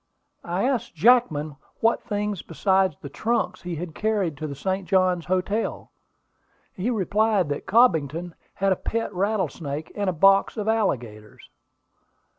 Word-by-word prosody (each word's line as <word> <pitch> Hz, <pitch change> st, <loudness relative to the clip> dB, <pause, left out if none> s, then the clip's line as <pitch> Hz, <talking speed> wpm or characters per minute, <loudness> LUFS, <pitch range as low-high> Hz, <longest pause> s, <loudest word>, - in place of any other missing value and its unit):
"I 175 Hz, +3 st, -2 dB
asked 250 Hz, -8 st, -1 dB
Jackman 155 Hz, -, +3 dB, 0.2 s
what 230 Hz, +1 st, +2 dB
things 210 Hz, -4 st, -3 dB
besides 190 Hz, 0 st, +1 dB
the -, -, -8 dB
trunks 225 Hz, +12 st, -1 dB
he 175 Hz, -1 st, -5 dB
had 165 Hz, 0 st, -6 dB
carried 205 Hz, -5 st, -1 dB
to 155 Hz, -, -4 dB
the 140 Hz, -, -6 dB
St. 190 Hz, +5 st, -3 dB
Johns 185 Hz, -3 st, +2 dB
Hotel. 185 Hz, +4 st, -1 dB, 0.8 s
He 195 Hz, +6 st, -2 dB
replied 210 Hz, -4 st, +1 dB
that 145 Hz, -, -4 dB
Cobbington 175 Hz, -, +2 dB, 0.2 s
had 195 Hz, 0 st, +1 dB
a -, -, +4 dB
pet 225 Hz, -2 st, -3 dB
rattlesnake 180 Hz, -7 st, -2 dB
and 205 Hz, -2 st, -1 dB
a -, -, -1 dB
box 195 Hz, +6 st, +4 dB
of 210 Hz, 0 st, -3 dB
alligators." 120 Hz, -, -2 dB
190 Hz, 140 wpm, -24 LUFS, 160-215 Hz, 0.8 s, a